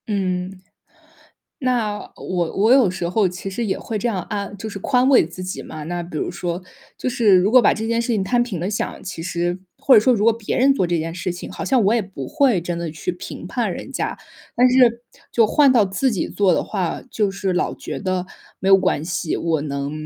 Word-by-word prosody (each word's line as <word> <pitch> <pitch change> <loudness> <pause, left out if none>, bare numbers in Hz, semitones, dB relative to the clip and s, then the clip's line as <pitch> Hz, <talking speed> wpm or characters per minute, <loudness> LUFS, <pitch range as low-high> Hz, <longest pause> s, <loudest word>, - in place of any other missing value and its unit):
嗯。 185 -2 -2 1.0
那 235 -6 0
我 175 -3 -3
我 215 +5 +4
有 260 -8 +5
时 175 -1 -3
候 200 +3 +2
其 180 +2 -7
实 230 +5 -3
也 190 - -1
会 220 - -4
这 210 - -2
样 200 -5 -1
安 205 -1 -4
就 220 - -5
是 200 - -6
宽 255 +3 +2
慰 270 -9 +6
自 175 +2 -9
己 185 +1 -5
嘛， 155 - -8
那 175 +2 -3
比 170 -2 -6
如 - - -2
说， 175 +1 -4 0.4
就 - - -2
是 230 -6 +4
如 185 +3 +3
果 250 +1 +7
把 - - +5
这 220 +1 -4
件 230 0 +1
事 235 - -5
情 220 -5 +1
摊 240 +4 +2
平 215 -9 -4
了 180 - -2
想， 210 - -3
其 185 -4 -6
实 175 +1 -2 0.2
或 275 -1 +5
者 - - +8
说 255 +4 +4
如 210 -2 0
果 230 - +6
别 225 -2 -3
人 270 +2 +5
做 185 - +1
这 170 -1 0
件 165 +1 -4
事 180 0 -3
情， 175 - -8
好 - - -6
像 260 -3 +3
我 205 +4 +3
也 235 - +1
不 195 0 -8
会 275 - +2
真 175 0 -4
的 170 -1 -3
去 160 - -4
评 - - -8
判 - - -1
人 - - -8
家。 - - -2 0.4
但 250 +1 +5
是 240 -2 +4 0.3
就 230 -2 +4
换 280 +4 +4
到 235 -5 +5
自 195 +8 0
己 190 - -2
做 195 -3 +2
的 - - +1
话， 175 -3 -2
就 210 -3 0
是 195 -1 -2
老 180 - 0
觉 - - -6
得 185 -2 -2 0.3
没 190 - -1
有 195 - +8
关 170 -5 0
系， 160 -1 -2
我 160 -3 0
能 140 -1 -3
195 Hz, 255 characters per minute, -21 LUFS, 175-230 Hz, 1.0 s, 者